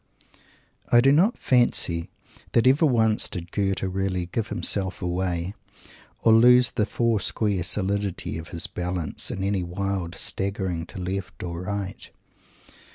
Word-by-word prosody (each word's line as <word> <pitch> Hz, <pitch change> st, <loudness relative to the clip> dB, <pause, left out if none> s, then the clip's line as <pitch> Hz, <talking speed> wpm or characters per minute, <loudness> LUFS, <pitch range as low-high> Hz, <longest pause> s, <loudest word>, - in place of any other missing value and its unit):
I 120 Hz, -, +7 dB
do 135 Hz, +3 st, +5 dB
not 185 Hz, -, +3 dB
fancy 90 Hz, -9 st, +2 dB, 0.4 s
that 115 Hz, -, +3 dB
ever 140 Hz, +5 st, +5 dB
once 110 Hz, -4 st, +2 dB
did 85 Hz, -2 st, -6 dB
Goethe 95 Hz, -2 st, -1 dB
really 95 Hz, -1 st, -1 dB
"give 110 Hz, +5 st, -3 dB
himself 95 Hz, -4 st, 0 dB
away," 90 Hz, 0 st, -2 dB, 0.7 s
or 115 Hz, -, +6 dB
lose 125 Hz, +2 st, +6 dB
the 105 Hz, -3 st, 0 dB
foursquare 110 Hz, -3 st, 0 dB
solidity 100 Hz, -1 st, -1 dB
of 80 Hz, -, -9 dB
his 85 Hz, -2 st, -4 dB
balance 90 Hz, -4 st, -3 dB
in 95 Hz, -, -4 dB
any 100 Hz, -1 st, 0 dB
wild 90 Hz, 0 st, -3 dB
staggering 95 Hz, -4 st, -3 dB
to -, -, -9 dB
left 95 Hz, +1 st, -5 dB
or 85 Hz, -1 st, -5 dB
right. 100 Hz, -1 st, -5 dB
95 Hz, 135 wpm, -25 LUFS, 90-110 Hz, 0.7 s, I